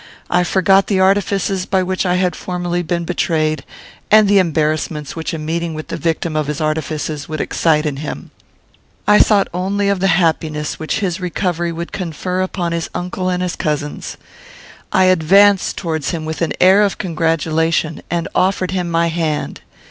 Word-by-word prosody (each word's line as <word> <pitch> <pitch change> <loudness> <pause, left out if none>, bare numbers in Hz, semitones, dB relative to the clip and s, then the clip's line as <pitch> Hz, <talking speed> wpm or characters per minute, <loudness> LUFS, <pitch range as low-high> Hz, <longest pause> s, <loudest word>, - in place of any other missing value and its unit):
I 180 0 +3
forgot 195 +2 +3
the 195 -3 +1
artifices 195 -1 +1
by 190 -1 +1
which 185 +1 -1
I 180 - +2
had 180 -1 +1
formerly 175 -1 -3
been 170 0 -2
betrayed, 155 -3 0 0.5
and 215 -1 +6
the 200 0 +5
embarrassments 155 -3 -1
which 165 -1 -4
a 165 - -3
meeting 165 +1 -3
with 155 - -7
the - - -3
victim 165 -1 -2
of 155 -2 0
his 150 0 -3
artifices 155 -1 -3
would 155 -1 -4
excite 155 0 +1
in 145 -2 -2
him; 150 +1 -6 0.8
I 210 0 +6
thought 205 -2 +4
only 200 +3 0
of 200 -2 +1
the 195 - +2
happiness 160 -4 0
which 160 +7 -2
his 185 -2 -2
recovery 175 -1 -1
would 170 +1 -6
confer 180 +1 -3
upon 185 -2 -2
his 170 -1 -2
uncle 185 +1 -2
and 180 0 -1
his 180 - -2
cousins. 150 -1 -3 0.7
I 190 - +4
advanced 185 +3 +4
towards 160 -5 -2
him 165 -3 -3
with 160 +1 -5
an 165 -3 0
air 190 +3 +6
of 205 -2 +1
congratulation, 165 -1 0
and 170 0 -1
offered 185 -1 +1
him 180 -2 -2
my 170 0 +2
hand. 160 -2 -2
170 Hz, 175 wpm, -18 LUFS, 160-185 Hz, 0.8 s, and